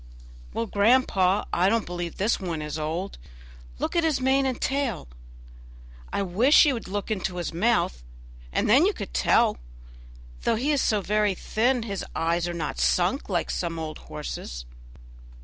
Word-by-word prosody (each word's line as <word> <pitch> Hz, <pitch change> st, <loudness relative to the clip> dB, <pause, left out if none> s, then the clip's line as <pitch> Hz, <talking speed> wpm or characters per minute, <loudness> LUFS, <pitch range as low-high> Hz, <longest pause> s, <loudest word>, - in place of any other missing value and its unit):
"Well, 115 Hz, -, -2 dB
grandpapa, 200 Hz, -, +3 dB
I 180 Hz, +2 st, +3 dB
don't 225 Hz, -1 st, +1 dB
believe 175 Hz, -1 st, -4 dB
that -, -, -18 dB
this 210 Hz, +5 st, +1 dB
one 170 Hz, -5 st, -4 dB
is 150 Hz, +1 st, -4 dB
old; 165 Hz, +6 st, -4 dB, 0.6 s
look -, -, -3 dB
at 340 Hz, -, +3 dB
his 315 Hz, -4 st, +1 dB
mane 265 Hz, +1 st, +2 dB
and 255 Hz, -2 st, -2 dB
tail. 270 Hz, -, -1 dB, 1.0 s
I 200 Hz, -, 0 dB
wish 220 Hz, -, +5 dB
you 290 Hz, -, +3 dB
would 230 Hz, -, -6 dB
look 205 Hz, +3 st, -4 dB
into 190 Hz, -3 st, -2 dB
his 175 Hz, -1 st, -3 dB
mouth, 175 Hz, -, +1 dB, 0.5 s
and -, -, 0 dB
then 270 Hz, -, +6 dB
you 415 Hz, -, +1 dB
could 200 Hz, -, -7 dB
tell; -, -, +3 dB, 0.8 s
though -, -, +1 dB
he 265 Hz, +7 st, 0 dB
is 285 Hz, -2 st, +2 dB
so 210 Hz, -2 st, +1 dB
very 210 Hz, 0 st, +1 dB
thin, 240 Hz, +6 st, 0 dB
his 200 Hz, -4 st, -4 dB
eyes 170 Hz, +1 st, 0 dB
are 175 Hz, -, -3 dB
not 155 Hz, -3 st, -4 dB
sunk 185 Hz, +10 st, +1 dB
like 175 Hz, -3 st, -1 dB
some 170 Hz, -2 st, -3 dB
old 160 Hz, -1 st, -5 dB
horses'." -, -, -7 dB
200 Hz, 170 wpm, -26 LUFS, 170-240 Hz, 1.0 s, then